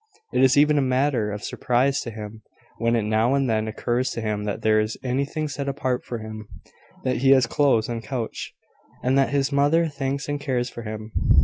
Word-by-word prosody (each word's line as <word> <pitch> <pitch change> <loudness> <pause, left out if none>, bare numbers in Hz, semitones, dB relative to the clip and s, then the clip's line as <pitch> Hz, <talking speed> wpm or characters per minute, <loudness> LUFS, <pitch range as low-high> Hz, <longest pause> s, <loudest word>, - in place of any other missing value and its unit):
It - - +2
is 130 +1 +5
even 150 0 +5
a - - +3
matter 130 -4 +1
of 105 0 -6
surprise 130 +3 +1
to - - -5
him 110 0 -8 0.4
when 115 +1 +2
it 115 - +1
now 110 +5 +2
and 135 -1 +1
then 110 -1 0
occurs 120 +3 -1
to 115 - -4
him 105 -1 -2
that 105 - -3
there 110 0 +4
is 110 +1 -1
anything 140 +4 -1
set 140 -1 -3
apart 130 -3 -1
for 120 - -5
him, 110 -1 -8 0.6
that 130 -1 0
he 135 +3 +2
has 130 -2 +4
clothes 115 -3 +2
and 115 -1 -4
couch, 115 +1 -4 0.5
and 130 +1 +2
that 135 -2 +3
his 140 +1 0
mother 145 +4 +3
thinks 140 -1 -3
and 145 0 -3
cares 125 -3 -1
for 120 - -7
him. 110 0 -7
125 Hz, 210 wpm, -24 LUFS, 110-140 Hz, 0.6 s, is